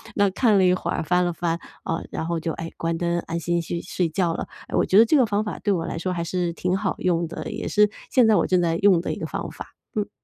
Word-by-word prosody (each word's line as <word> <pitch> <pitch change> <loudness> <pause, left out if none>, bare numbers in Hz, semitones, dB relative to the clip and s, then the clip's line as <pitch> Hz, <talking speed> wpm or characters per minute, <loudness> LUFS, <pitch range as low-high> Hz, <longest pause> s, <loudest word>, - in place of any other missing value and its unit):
那 200 - +4
看 215 0 +3
了 190 - +4
一 180 - +5
会 185 - -3
儿 - - -1
翻 180 +2 +2
了 175 - 0
翻， 165 0 -1 0.3
啊， 165 - -2
然 - - -3
后 170 -1 -1
就， 165 +1 -2
哎， 165 0 -6
关 165 0 -2
灯 170 0 0
安 170 0 -4
心 170 +1 0
去 170 +1 -4
睡 180 -2 -1
觉 170 0 0
了， - - -4 0.2
哎 - - -4
我 - - +3
觉 190 - +3
得 225 - +8
这 305 - +3
个 265 -4 +5
方 210 0 0
法 210 - -5
对 205 - 0
我 165 -3 -1
来 170 - -4
说 185 - -2
还 170 -2 -2
是 175 0 -1
挺 180 +2 -1
好 195 0 -1
用 170 -2 0
的， - - -6
也 220 +1 -5
是 210 0 +4 0.2
现 250 -4 +5
在 220 - +5
我 - - +3
正 185 - +2
在 165 -1 +1
用 190 -2 +5
的 - - -3
一 - - -4
个 - - -4
方 - - -4
法。 - - -10 0.2
嗯。 210 -1 -1
180 Hz, 315 characters per minute, -24 LUFS, 170-200 Hz, 0.3 s, 得